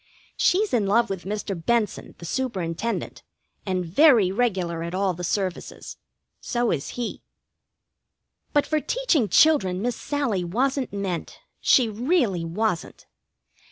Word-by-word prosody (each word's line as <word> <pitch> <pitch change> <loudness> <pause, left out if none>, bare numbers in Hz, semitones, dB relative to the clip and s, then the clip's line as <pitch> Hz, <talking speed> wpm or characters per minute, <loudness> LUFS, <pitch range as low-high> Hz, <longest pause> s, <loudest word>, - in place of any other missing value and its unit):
She's 405 0 +2
in 215 -5 +2
love 230 +2 +2
with 190 -2 -5
Mr. 205 0 -3
Benson, 210 +5 -1
the 170 - -10
Superintendent, 215 -2 -3 0.5
and 185 -1 -1
very 215 - +5
regular 190 -7 -1
at 170 +2 -4
all 190 -1 +1
the 180 +1 -7
services. 185 +1 -3 0.4
So 240 -1 -1
is 140 -4 -2
he. 240 -2 -4 1.3
But 290 - +2
for 310 - 0
teaching 335 - +1
children 195 -13 +4
Miss 240 +3 -1
Sallie 260 -12 -1
wasn't 260 +8 -1
meant. 195 -4 -4 0.2
She 250 -3 +4
really 225 - 0
wasn't. 175 +2 -2
210 Hz, 125 wpm, -24 LUFS, 180-250 Hz, 1.3 s, very